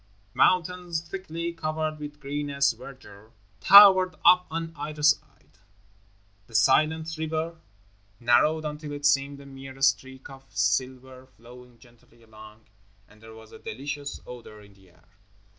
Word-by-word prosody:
Mountains, 180 Hz, -2 st, 0 dB
thickly 170 Hz, -3 st, -6 dB
covered 155 Hz, -1 st, -4 dB
with 150 Hz, 0 st, -9 dB
greenest 140 Hz, -1 st, -1 dB
verdure, 110 Hz, -5 st, -14 dB, 0.3 s
towered 190 Hz, -2 st, +7 dB
up 180 Hz, 0 st, +6 dB
on 165 Hz, 0 st, -5 dB
either 150 Hz, +1 st, -7 dB
side, 150 Hz, -9 st, -1 dB, 0.9 s
the 115 Hz, -, -14 dB
silent 155 Hz, +7 st, +2 dB
river 160 Hz, +1 st, -3 dB, 0.6 s
narrowed 150 Hz, +7 st, +2 dB
until 150 Hz, 0 st, -6 dB
it 145 Hz, 0 st, -6 dB
seemed 140 Hz, 0 st, +1 dB
a 140 Hz, -, -13 dB
mere 135 Hz, -1 st, -12 dB
streak 130 Hz, 0 st, 0 dB
of 135 Hz, 0 st, -14 dB
silver 130 Hz, +6 st, -2 dB
flowing 125 Hz, 0 st, -17 dB
gently 120 Hz, 0 st, -23 dB
along, 110 Hz, 0 st, -16 dB, 0.4 s
and 110 Hz, 0 st, -22 dB
there 110 Hz, 0 st, -13 dB
was 110 Hz, 0 st, -15 dB
a -, -, -13 dB
delicious 140 Hz, +4 st, -7 dB
odor 120 Hz, -3 st, -12 dB
in 100 Hz, -1 st, -18 dB
the 95 Hz, -1 st, -23 dB
air. 85 Hz, -, -27 dB
140 Hz, 135 wpm, -26 LUFS, 120-155 Hz, 0.9 s, towered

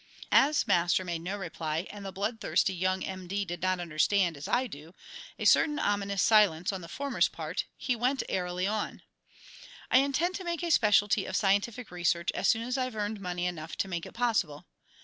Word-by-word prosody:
As 290 Hz, +2 st, +4 dB
Master 175 Hz, +2 st, +2 dB
made 170 Hz, -2 st, -3 dB
no 190 Hz, +4 st, -4 dB
reply 165 Hz, -3 st, -3 dB
and 205 Hz, -1 st, -9 dB
the 195 Hz, -, -5 dB
blood 205 Hz, +4 st, -3 dB
thirsty 190 Hz, -, +1 dB
young 185 Hz, +1 st, -1 dB
M. 185 Hz, -1 st, -6 dB
D. 200 Hz, +2 st, -2 dB
did 175 Hz, -2 st, -6 dB
not 185 Hz, 0 st, +1 dB
understand, 175 Hz, +2 st, +1 dB
as 140 Hz, +1 st, -7 dB
I 255 Hz, +1 st, +1 dB
do, 165 Hz, -, -11 dB, 0.4 s
a -, -, -4 dB
certain 300 Hz, -2 st, +4 dB
ominous 200 Hz, -6 st, 0 dB
silence 200 Hz, -5 st, +4 dB
on 190 Hz, -, -5 dB
the 170 Hz, -, -9 dB
former's 250 Hz, -1 st, 0 dB
part, 160 Hz, +3 st, -4 dB
he 250 Hz, -, -1 dB
went 255 Hz, +4 st, 0 dB
airily 180 Hz, 0 st, -2 dB
on: 210 Hz, +1 st, -3 dB, 0.9 s
"I 255 Hz, -, +7 dB
intend 280 Hz, +6 st, +1 dB
to 380 Hz, -, -8 dB
make 345 Hz, -1 st, -3 dB
a 340 Hz, -, -1 dB
specialty 210 Hz, -5 st, +4 dB
of 190 Hz, -, -4 dB
scientific 205 Hz, +4 st, 0 dB
research 175 Hz, 0 st, 0 dB
as -, -, -1 dB
soon 225 Hz, 0 st, +3 dB
as 250 Hz, +2 st, -2 dB
I've 255 Hz, -2 st, -2 dB
earned 210 Hz, 0 st, -3 dB
money 180 Hz, -1 st, -3 dB
enough 160 Hz, -3 st, -4 dB
to 170 Hz, +5 st, -1 dB
make 170 Hz, -3 st, -4 dB
it -, -, -13 dB
possible. 210 Hz, -12 st, 0 dB
195 Hz, 200 wpm, -29 LUFS, 175-225 Hz, 0.9 s, I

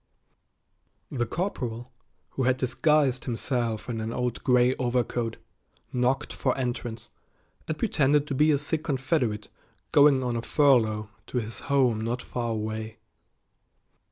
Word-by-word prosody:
The 120 Hz, -4 st, -1 dB
corporal, 125 Hz, -, -3 dB, 0.4 s
who 130 Hz, -, -1 dB
had 130 Hz, 0 st, +3 dB
disguised 135 Hz, 0 st, +2 dB
himself 120 Hz, -2 st, -2 dB
in 115 Hz, -3 st, -3 dB
an 110 Hz, +1 st, -3 dB
old 125 Hz, 0 st, -2 dB
gray 125 Hz, 0 st, +4 dB
overcoat, 120 Hz, -2 st, -1 dB, 0.6 s
knocked 130 Hz, +3 st, 0 dB
for 130 Hz, -, 0 dB
entrance, 120 Hz, -3 st, -4 dB, 0.6 s
and 155 Hz, -, -2 dB
pretended 150 Hz, -8 st, +2 dB
to 150 Hz, -, -4 dB
be 150 Hz, +4 st, +3 dB
a 150 Hz, -, +4 dB
sick 155 Hz, +2 st, -2 dB
Confederate 130 Hz, -6 st, 0 dB, 0.4 s
going 145 Hz, -2 st, +6 dB
on 120 Hz, -1 st, -1 dB
a 115 Hz, -, -1 dB
furlough 110 Hz, -7 st, +2 dB, 0.2 s
to -, -, -4 dB
his 115 Hz, -1 st, -3 dB
home 125 Hz, -6 st, +3 dB
not 120 Hz, +3 st, -2 dB
far 120 Hz, -1 st, -3 dB
away. 110 Hz, 0 st, -4 dB
125 Hz, 130 wpm, -27 LUFS, 115-140 Hz, 0.6 s, going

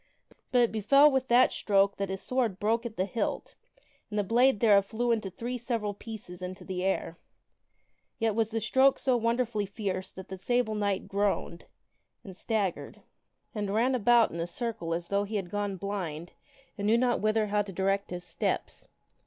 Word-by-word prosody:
But 250 Hz, -, +4 dB
it 235 Hz, -, +3 dB
befell 275 Hz, +8 st, +5 dB
with 265 Hz, -1 st, 0 dB
that 245 Hz, +2 st, +5 dB
stroke 200 Hz, -1 st, +2 dB
that 195 Hz, -1 st, -2 dB
his 190 Hz, 0 st, -4 dB
sword 240 Hz, -7 st, -1 dB
broke 230 Hz, +3 st, 0 dB
at 220 Hz, -, -11 dB
the 185 Hz, -, 0 dB
hilt 225 Hz, +3 st, -3 dB, 0.6 s
and 210 Hz, -, -4 dB
the 205 Hz, -, +2 dB
blade 240 Hz, +3 st, +3 dB
thereof 200 Hz, -3 st, +5 dB
flew 235 Hz, +3 st, -1 dB
into 215 Hz, -4 st, 0 dB
three 240 Hz, +6 st, -5 dB
several 230 Hz, -4 st, -2 dB
pieces 200 Hz, -4 st, -9 dB
into 185 Hz, 0 st, -7 dB
the 185 Hz, -1 st, -3 dB
air. 185 Hz, -3 st, -1 dB, 1.0 s
Yet 225 Hz, -1 st, +1 dB
was 220 Hz, 0 st, 0 dB
the 225 Hz, 0 st, -2 dB
stroke 265 Hz, +5 st, +4 dB
so 260 Hz, -2 st, +1 dB
wonderfully 230 Hz, -2 st, 0 dB
fierce 190 Hz, -2 st, -4 dB
that 190 Hz, -, -9 dB
the 190 Hz, -1 st, -7 dB
Sable 240 Hz, +1 st, 0 dB
Knight 205 Hz, -2 st, -1 dB
groaned, 200 Hz, -4 st, -1 dB, 0.6 s
and 190 Hz, -3 st, -10 dB
staggered, 200 Hz, -3 st, -3 dB, 0.5 s
and 205 Hz, -3 st, -3 dB
ran 245 Hz, +4 st, +2 dB
about 240 Hz, -1 st, +4 dB
in 170 Hz, -, -6 dB
a 170 Hz, -, -2 dB
circle 175 Hz, -6 st, -3 dB
as 170 Hz, 0 st, -5 dB
though 200 Hz, 0 st, +1 dB
he 210 Hz, +2 st, -5 dB
had 190 Hz, -4 st, -3 dB
gone 205 Hz, -1 st, -2 dB
blind 175 Hz, -4 st, -5 dB, 0.5 s
and 200 Hz, -, -1 dB
knew 225 Hz, +2 st, +4 dB
not 245 Hz, 0 st, +1 dB
whither 215 Hz, +1 st, +2 dB, 0.2 s
to 200 Hz, -, -8 dB
direct 195 Hz, +2 st, 0 dB
his 180 Hz, 0 st, -6 dB
steps. 170 Hz, -1 st, -3 dB
210 Hz, 185 wpm, -29 LUFS, 190-235 Hz, 1.0 s, befell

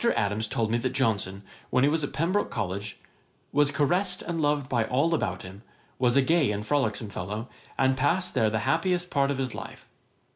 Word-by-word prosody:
Adams 105 Hz, +2 st, 0 dB
told 110 Hz, 0 st, -1 dB
me 120 Hz, -, +2 dB
that 130 Hz, +1 st, -2 dB
Johnson, 100 Hz, -7 st, 0 dB, 0.3 s
while 130 Hz, -, +3 dB
he -, -, +5 dB
was 155 Hz, 0 st, 0 dB
at 145 Hz, -, -2 dB
Pembroke 180 Hz, +6 st, 0 dB
College, 100 Hz, -2 st, -4 dB, 0.5 s
'was 145 Hz, 0 st, +4 dB
caressed 175 Hz, +7 st, 0 dB
and 165 Hz, -2 st, -2 dB
loved 145 Hz, -2 st, +1 dB
by 120 Hz, -3 st, +1 dB
all 140 Hz, +8 st, +1 dB
about 165 Hz, -, -1 dB
him, 95 Hz, +2 st, -10 dB, 0.4 s
was 125 Hz, 0 st, +3 dB
a 140 Hz, -, +5 dB
gay 160 Hz, -2 st, +3 dB
and 105 Hz, 0 st, -2 dB
frolicksome 110 Hz, -6 st, 0 dB
fellow, 105 Hz, +5 st, -5 dB, 0.3 s
and 130 Hz, -1 st, +3 dB
passed 145 Hz, +8 st, +1 dB
there 115 Hz, -5 st, +3 dB
the 110 Hz, 0 st, -1 dB
happiest 175 Hz, +5 st, +1 dB
part 140 Hz, -1 st, +2 dB
of 140 Hz, -, -1 dB
his 130 Hz, -3 st, -2 dB
life.' -, -, -9 dB
130 Hz, 195 wpm, -27 LUFS, 110-150 Hz, 0.5 s, he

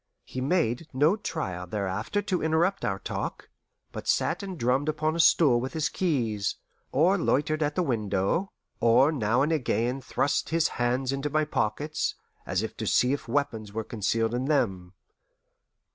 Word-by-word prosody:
He 130 Hz, -, -6 dB
made 150 Hz, -2 st, 0 dB
no 150 Hz, +8 st, +4 dB
trial 95 Hz, -, -4 dB
thereafter 105 Hz, -, -2 dB
to 185 Hz, -3 st, -1 dB
interrupt 160 Hz, +5 st, +1 dB
our 95 Hz, -2 st, 0 dB
talk, -, -, -5 dB, 0.4 s
but -, -, -7 dB
sat -, -, +1 dB
and 190 Hz, -3 st, -6 dB
drummed 130 Hz, +4 st, +1 dB
upon 155 Hz, +1 st, 0 dB
a -, -, -3 dB
stool 145 Hz, -6 st, +5 dB
with 130 Hz, -, -4 dB
his 160 Hz, -2 st, 0 dB
keys, 115 Hz, -, -1 dB, 0.4 s
or 180 Hz, +7 st, +3 dB
loitered 155 Hz, 0 st, +1 dB
at 150 Hz, -1 st, 0 dB
the 180 Hz, -, +1 dB
window, 110 Hz, -, 0 dB, 0.3 s
or 120 Hz, +6 st, +5 dB
now 120 Hz, -2 st, +1 dB
and 150 Hz, -, 0 dB
again 125 Hz, -3 st, 0 dB
thrust 135 Hz, +2 st, 0 dB
his 165 Hz, 0 st, +2 dB
hand 125 Hz, +2 st, 0 dB
into 135 Hz, +2 st, -2 dB
my 155 Hz, +1 st, +1 dB
pockets, 150 Hz, +3 st, -1 dB, 0.3 s
as -, -, 0 dB
if -, -, -5 dB
to -, -, -3 dB
see 125 Hz, +3 st, +3 dB
if 145 Hz, -, -4 dB
weapons 115 Hz, -5 st, -2 dB
were 110 Hz, +1 st, -2 dB
concealed 115 Hz, +1 st, -1 dB
in 125 Hz, +2 st, -1 dB
them. 95 Hz, -11 st, 0 dB
135 Hz, 165 wpm, -27 LUFS, 115-155 Hz, 0.4 s, stool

